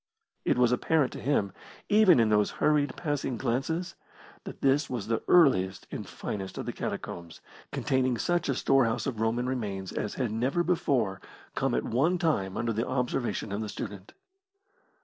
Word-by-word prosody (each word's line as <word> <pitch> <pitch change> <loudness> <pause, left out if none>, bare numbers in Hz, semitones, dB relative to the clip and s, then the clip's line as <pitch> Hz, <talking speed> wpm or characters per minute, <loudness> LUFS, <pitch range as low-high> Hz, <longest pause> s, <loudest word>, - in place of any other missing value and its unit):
It - - +2
was 125 -1 +4
apparent 145 +3 +1
to - - -7
him, 105 -8 0 0.3
even 205 - +6
in 115 -2 +4
those 105 -1 +3
hurried, 150 -1 +2
passing 145 -6 -2
glances, 135 +9 -1 0.5
that - - -9
this 140 +2 +2
was 120 -6 -3
the 115 +1 -1
earliest 95 - +4
and - - -6
finest 95 -2 -5
of - - -4
the - - -4
catacombs, 85 -1 -6 0.3
containing 130 -2 0
such 175 +4 0
a 135 - +1
storehouse 120 -4 +2
of 115 -6 -3
Roman 115 +2 0
remains 100 -7 -3
as 105 - -3
had 125 -5 -1
never 130 +10 0
before 125 - 0 0.3
come - - 0
at - - 0
one 155 +10 +1
time 100 - 0
under 115 0 -1
the 115 +3 -1
observation 125 -4 -1
of 100 +2 -2
the 110 - -4
student. 100 -1 -7
125 Hz, 170 wpm, -28 LUFS, 105-145 Hz, 0.5 s, even